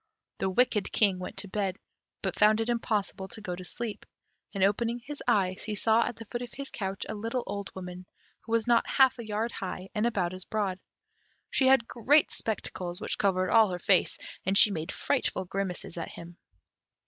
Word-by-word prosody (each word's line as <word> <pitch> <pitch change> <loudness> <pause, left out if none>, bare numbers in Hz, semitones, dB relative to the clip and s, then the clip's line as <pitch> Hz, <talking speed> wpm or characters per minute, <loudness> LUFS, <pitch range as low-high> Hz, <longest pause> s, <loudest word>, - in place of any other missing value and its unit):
The 190 - 0
wicked 210 0 +2
King 195 -4 +3
went 180 - -7
to 205 - -1
bed, 195 -1 -2 0.5
but - - -1
found 215 +1 +5
it 225 +1 -1
impossible 215 -4 -1
to 220 - -7
go 185 -4 -4
to 185 - -8
sleep, 220 +4 -5 0.5
and 195 -2 -1
opening 230 +4 +2
his 285 +4 -8
eyes, 185 -1 +1
he 215 -1 -3
saw 225 +3 +3
at - - -3
the 225 - -10
foot 240 +3 -5
of 245 - -6
his 275 0 -5
couch 195 -2 -3
a - - -4
little 230 +4 -3
old 200 0 -5
woman, 180 -1 -8 0.3
who 225 - -12
was 230 -1 +2
not 240 -1 +3
half 265 -2 +4
a 230 - -6
yard 220 +2 -1
high, 185 0 -6
and 215 +2 +1
about 185 -6 -1
as 185 0 -5
broad; 200 -4 -2 0.7
she 265 - +3
had 260 -3 +5
great 285 +6 +3
spectacles, 180 -5 -3
which - - -3
covered 185 -2 +1
all 225 -3 +6
her 180 - -3
face, 185 +1 +2 0.3
and 190 +2 +2
she 210 - +9
made 160 -4 -3
frightful 255 -9 0
grimaces 190 -1 -3
at - - -5
him. 170 +1 -11
205 Hz, 200 wpm, -29 LUFS, 185-230 Hz, 0.7 s, she